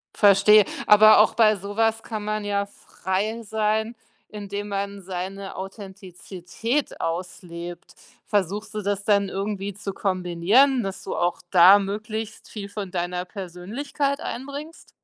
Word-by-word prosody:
Verstehe. 205 +1 +6 0.2
Aber 215 0 +8
auch 215 - +5
bei 215 -2 +5
so 200 +1 -8
was 225 0 +1
kann 215 -2 -5
man 215 0 -2
ja 200 -1 -1
frei 200 +2 -4
sein, 220 +2 -1 0.3
indem 205 0 -6
man 200 0 -4
seine 190 +1 -6
Authentizität 195 - -5
auslebt. 175 0 -6 0.3
Versuchst 205 +2 -1
du 215 - -3
das 200 0 -2
dann 200 -1 +2
irgendwie 200 0 -4
zu 195 0 -6
kombinieren, 195 +8 +2
dass 195 -1 -5
du - - -4
auch 175 0 0
da 185 +2 +8
möglichst 215 +2 -5
viel 200 -2 -7
von 200 -2 -6
deiner 180 0 -3
Persönlichkeit 210 - -4
einbringst? 285 +5 -7
200 Hz, 130 wpm, -24 LUFS, 190-215 Hz, 0.3 s, Aber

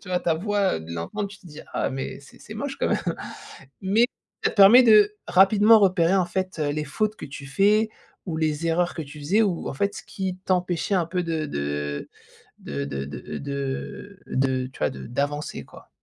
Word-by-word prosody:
tu - - -13
vois, 180 -1 0
ta 165 - +1
voix, 200 +3 0
heu, 80 - -5
de 80 +1 -9
l'entendre. 85 - -4
Tu 200 0 -13
te 185 - -17
dis: 155 -2 -10
«Ah, - - 0
mais 135 0 -5
c'est - - -17
c'est - - -10
moche - - -4
quand - - +1
même». - - +1 0.8
Mais 210 +5 +3 0.4
ça - - +2
permet 215 +5 +8
de 210 -3 +6
rapidement 205 +5 +6
repérer, 185 -2 +3
en 185 -2 +3
fait, 185 0 -3
heu, 150 -1 0
les 150 +1 -2
fautes 215 +9 -1
que - - -7
tu 140 0 -9
fais 210 +9 +3 0.4
ou 165 -4 -3
les 155 +1 0
erreurs 175 +2 +1
que 165 - -3
tu 145 +1 -11
faisais 180 +10 +2
ou, 180 -5 -1
en - - -5
fait, 200 +8 -1
ce - - -8
qui 190 -2 -4
t'empêchait 180 +1 0
un 175 -3 +2
peu 180 0 -1
de 160 -2 -2
de 75 - -3 0.5
de 70 0 -4
de 70 -1 -4
de 70 - -7
de 140 +9 -5
de 130 -1 0
tu 130 - -15
vois, - - +2
de - - -9
d'avancer, 145 +5 -3
quoi. - - -16
175 Hz, 215 wpm, -24 LUFS, 140-200 Hz, 0.8 s, permet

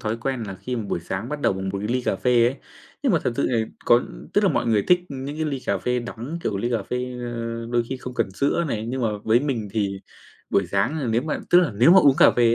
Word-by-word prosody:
thói 110 +1 -2
quen 125 0 -3
là 100 -3 -5
khi 125 +6 -5
mà 115 - -2
buổi - - -1
sáng 95 +7 -4
bắt 150 0 -4
đầu - - +2
bằng 95 0 -4
một 100 +1 -3
ly 125 +4 -1
cà - - 0
phê 120 -2 +3
ấy, 130 +3 -1 0.5
nhưng 260 -7 +2
mà 165 - +4
thật 120 - +1
sự - - +1
thì 115 -3 +1 0.2
có 120 +1 +5 0.3
tức - - +3
là - - +4
mọi - - 0
người 105 -3 +3
thích 180 0 +5
những 140 +1 -6
cái 160 - -1
ly 140 -4 -2
cà - - +1
phê 125 0 0
đắng, 120 +7 -6
kiểu, 105 - -1
ly 120 +5 -2
cà 115 -4 0
phê, 125 - -4 0.2
ơ, 115 -1 -4
đôi 120 -1 +2
khi 130 - -3
không 125 0 -8
cần 95 - 0
sữa 140 - 0
này, 110 -2 -3
nhưng 125 +1 -3
mà 115 - +2 0.2
với 115 +3 +4
mình 120 -8 -2
thì 100 -3 -1 0.5
buổi 100 -2 +2
sáng, 100 - 0
ờ, 130 - -2
nếu 115 +2 +1
mà 155 -1 -2
tức 175 - +8
là 160 -10 0
nếu 120 +10 +5
mà 190 - +9
uống 140 -5 +5
cà - - +8
phê 120 -1 +3
120 Hz, 285 wpm, -23 LUFS, 110-135 Hz, 0.5 s, mà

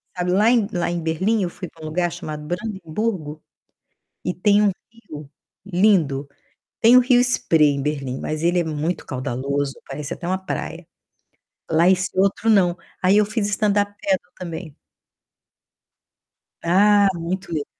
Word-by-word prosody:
sabe. 180 0 -1
Lá 210 +5 +4
em 230 -5 +3
lá 175 -1 -1
em 175 -1 -2
Berlim 185 +7 0
eu 180 - -1
fui 180 - -8
pra 160 0 -18
um - - -6
lugar 175 +2 -1
chamado 150 0 -7
Brandenburgo, 175 -3 -4 0.8
e 180 - 0
tem 205 +3 +3
um 200 - +3 0.2
rio 155 -11 -11 0.4
lindo, 175 -8 +2 0.5
tem 235 +2 +7
o - - +9
rio 245 0 +4
Spray 160 - +3
em 140 - -3
Berlim, 135 -3 -3
mas 155 +1 -4
ele 175 +1 +2
é - - -1
muito 160 +2 -3
caudaloso, 135 +1 -2
parece 140 +1 -5
até 170 - -8
uma 185 +1 0
praia. 175 -3 -5 0.9
Lá 165 +3 +4
esse 185 0 +2
outro 200 +3 +2
não, 185 -4 +4 0.2
aí 190 +3 +4
eu 210 - +4
fiz 215 0 -2
standup 205 0 +1
padel 190 -2 +1 0.2
também. 165 -3 -7 1.9
Ah, 200 +4 +5
muito 175 +2 -4
legal. 150 -3 -2
180 Hz, 155 wpm, -22 LUFS, 155-205 Hz, 1.9 s, o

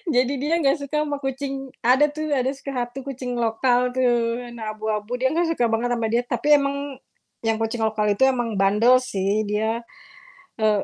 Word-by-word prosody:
jadi 255 +2 +3
dia 295 +5 -1
enggak 275 -1 +3
suka 300 +2 -1
sama 290 -2 -2
kucing 270 -1 -4
ada 255 +5 +5
tuh 310 0 -4
ada 265 -2 +1
suka 275 0 -7
hati 245 +3 -9
kucing 255 -2 -5
lokal 245 +2 +2
tuh 240 -1 +1
warna 235 -3 -6
abu-abu 215 0 -3
dia 260 +3 +1
enggak 335 0 +1
suka 245 -7 +1
banget 235 +2 0
sama 230 -1 -1
dia, 240 - +3
tapi 240 +3 -3
emang 280 0 -1 0.7
yang 225 -1 0
kucing 225 +1 -2
lokal 215 -1 0
itu 200 - -10
emang 240 -4 0
bandel 210 +6 +5
sih. 200 -3 -1
Dia, 220 +2 0 0.8
eee, 215 -2 +2
245 Hz, 185 wpm, -23 LUFS, 225-270 Hz, 0.8 s, ada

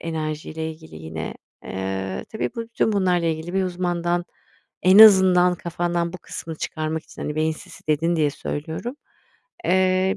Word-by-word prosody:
enerjiyle 160 0 -4
ilgili 160 - -12
yine. 80 0 -6 0.3
Eee, 95 0 -4
tabii 220 - -2
bu 230 - -2
bütün 230 -1 0
bunlarla 180 -4 +2
ilgili 160 +2 -2
bir 195 - +2
uzmandan 175 -1 -1 0.6
en 185 +3 +6
azından 185 -4 +8
kafandan 170 0 -2
bu 185 - -7
kısmını 160 -1 -7
çıkarmak 155 0 -3
için, - - -10
hani, 150 - -3
beyin 155 +1 +1
sisi 155 - -13
dedin 165 +3 +2
diye 150 -2 +2
söylüyorum. 160 - -5 0.7
Eee 185 +1 +2
170 Hz, 150 wpm, -23 LUFS, 155-185 Hz, 0.7 s, azından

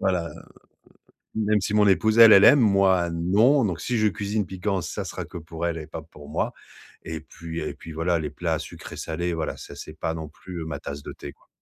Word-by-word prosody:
voilà, 90 -3 0 1.1
même 105 -1 +2
si 100 - -2
mon 105 -1 +5
épouse 110 +4 +3
elle, 115 -2 +11
elle 100 - +8
aime, 145 - +8
moi 95 -5 +3
non. 105 +12 +3
Donc, 90 -4 -2
si 125 - -1
je 110 -1 +3
cuisine 105 +1 -2
piquant, 95 +1 -2
ça - - -5
sera - - -5
que - - -9
pour 80 +1 -6
elle 85 -1 -1
et 80 -1 -7
pas 80 - -7
pour 75 -2 -14
moi. - - -1 0.6
Et - - -4
puis 85 0 -7
et - - -3
puis 80 - -11
voilà, 85 +2 +1
les 75 -2 -4
plats 80 +1 -1
sucrés-salés, 85 +2 -5
voilà, 80 -1 -3
ça, - - -10
c'est 75 - -9
pas 80 - -2
non 80 -1 -6
plus 85 +1 -8
ma 75 -3 -5
tasse 70 0 -7
de - - -7
thé, 70 - -9
quoi. - - -31
85 Hz, 220 wpm, -25 LUFS, 80-100 Hz, 1.1 s, elle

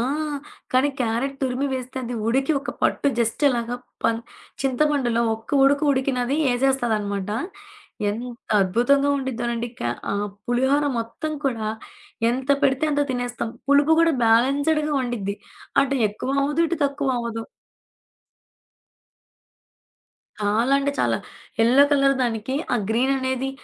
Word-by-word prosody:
ఆ! - - +1 0.7
కానీ 260 +3 +4
క్యారెక్ట్ 250 +4 -1
తురిమి 260 +2 0
వేస్తే 255 0 -5
అది 245 - -4
ఉడికి 270 +6 +2
ఒక 285 - -5
పట్టు - - +1
జస్ట్ 230 +5 0
అలాగా 240 -1 -1 0.3
పన్ 230 0 +2 0.4
చింతమండులో 265 -3 +1
ఒక్క 225 0 -12
ఉడుకు 285 +2 +3
ఉడికినది 260 0 0
యెసేస్తదనమాట. 230 -6 0 0.8
ఎంత 235 +4 -5 0.3
అద్భుతంగా 245 +9 +2
ఉండిద్దోనండి 240 -3 -2
క - - -3 0.3
ఆహ్, 205 +1 -1 0.2
పులిహోర 265 +4 +2
మొత్తం 230 +7 -4
కూడా, 230 -5 -1 0.6
ఎంత 260 +2 -3
పెడితే 275 +2 +2
అంత 290 0 +2
తినేస్తాం. 245 -2 -3 0.2
పులుపు 285 +2 +5
గూడా 330 -1 +4
బాలెన్స్డ్‌గా 285 +7 +3
ఉండిద్ది. 215 -5 -3 0.5
అంటే 275 0 0
ఎక్కువ 215 +6 -5
అవ్వదు. 295 +4 +1
ఇటు 340 - -2
తక్కువ 280 -1 -1
అవ్వదు. 230 -1 -4 3.0
చాలా 220 +6 +1
అంటే 285 +1 0
చాలా. - - +2 0.4
యెల్లో 245 +5 +6
కలర్ 275 -1 +4
దానికి 230 +2 -2 0.2
ఆ - - +3
గ్రీననేది 260 +2 0
255 Hz, 120 wpm, -23 LUFS, 230-275 Hz, 3.0 s, యెల్లో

